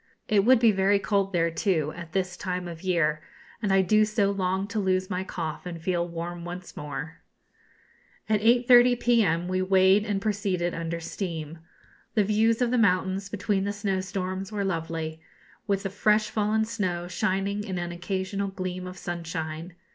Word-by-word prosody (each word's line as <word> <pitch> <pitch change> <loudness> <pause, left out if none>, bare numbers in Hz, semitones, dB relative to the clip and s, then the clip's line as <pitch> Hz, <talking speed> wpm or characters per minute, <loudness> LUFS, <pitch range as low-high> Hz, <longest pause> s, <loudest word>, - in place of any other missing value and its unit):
It 205 -2 +3
would 255 0 +6
be 230 -2 +5
very 195 +1 +3
cold 200 -1 0
there, 170 -2 +1
too, 160 -4 0
at 170 -1 -9
this 185 -2 -1
time 180 -1 -3
of 165 -1 -8
year; 165 -5 +1 0.4
and 205 -3 0
I 195 0 +5
do 215 +3 +4
so 210 -2 +1
long 190 0 -1
to 215 - -2
lose 185 0 0
my 180 +1 -1
cough 165 -2 -5
and 170 -2 -6
feel 175 +1 -1
warm 170 0 -5
once 175 +1 -8
more. 150 +2 -6 1.1
At 215 -1 +2
8.30 245 +1 +6
p.m. 200 -9 +2
we 185 0 0
weighed 190 +2 +4
and 205 -2 -1
proceeded 195 -4 -1
under 165 0 -3
steam. 165 -2 -5 0.6
The 215 - +4
views 220 +3 +2
of 240 - 0
the 250 - +2
mountains, 190 -1 +1
between 200 -1 -1
the 200 - -1
snowstorms, 190 -1 -3
were 205 -2 -2
lovely, 165 -3 -3 0.5
with 195 -1 0
the 195 - -3
fresh 210 +1 +2
fallen 215 +1 +1
snow 180 -6 -2
shining 195 +3 -1
in 190 -3 -4
an 175 0 -3
occasional 190 +3 -3
gleam 185 -1 -5
of 185 +1 -8
sunshine. 165 -1 -5
190 Hz, 170 wpm, -27 LUFS, 175-205 Hz, 1.1 s, would